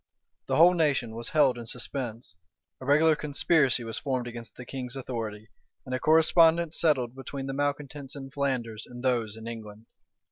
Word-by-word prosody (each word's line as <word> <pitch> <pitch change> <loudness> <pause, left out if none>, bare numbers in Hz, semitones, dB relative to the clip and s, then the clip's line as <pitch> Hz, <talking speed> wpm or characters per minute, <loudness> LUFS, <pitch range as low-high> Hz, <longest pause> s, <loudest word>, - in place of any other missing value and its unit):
The - - 0
whole 175 +3 +7
nation 145 -9 +1
was 115 +1 -5
held 135 -6 +3
in 115 - -8
suspense; 120 -4 -5 0.5
a 130 - -9
regular 155 +2 +5
conspiracy 145 -3 +2
was 115 -1 -4
formed 130 -4 -2
against 120 -1 -8
the 125 - -9
king's 125 0 -6
authority, 115 -5 -5 0.4
and 130 - -5
a 130 - 0
correspondence 160 +2 +4
settled 130 -7 +2
between 135 +1 -6
the 135 - -4
malecontents 145 -1 -3
in 135 -1 -8
Flanders 125 -6 -2
and 120 0 -10
those 115 -4 0
in 110 +1 -9
England. 110 -1 -8
130 Hz, 170 wpm, -28 LUFS, 115-145 Hz, 0.5 s, whole